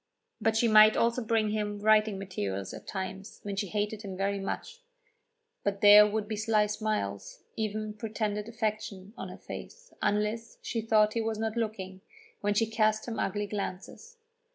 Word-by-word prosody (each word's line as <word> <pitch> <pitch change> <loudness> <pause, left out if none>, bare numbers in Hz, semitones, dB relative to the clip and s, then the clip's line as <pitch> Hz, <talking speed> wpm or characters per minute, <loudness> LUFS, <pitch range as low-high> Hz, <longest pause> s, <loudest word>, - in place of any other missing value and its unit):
But 220 0 +2
she 235 - +3
might 215 0 +7
also 235 +1 +2
bring 220 -1 +1
him 210 -1 -2
writing 215 -1 +4
materials 100 - -4
at - - -10
times 190 0 -6
when 200 -1 -4
she 200 +1 -2
hated 210 +2 -2
him 195 -3 -7
very 200 +1 0
much. 195 - -5 0.8
Then 200 -1 0
there 210 +1 +9
would 210 0 -2
be 220 - -3
sly 215 0 +2
smiles, 210 - -3
even 215 -1 -3
pretended 210 -1 -3
affection, 215 -3 -3
on - - -6
her - - -9
face, 485 0 -10
unless 210 +2 -1
she 230 - -2
thought 215 -1 +3
he 230 - 0
was 225 -1 -2
not 220 0 -2
looking, 195 -5 -3 0.4
when 205 0 0
she 225 - +3
cast 215 0 +1
him 230 -2 -4
ugly 205 +2 -1
glances. 205 - -6
215 Hz, 170 wpm, -29 LUFS, 205-220 Hz, 0.8 s, there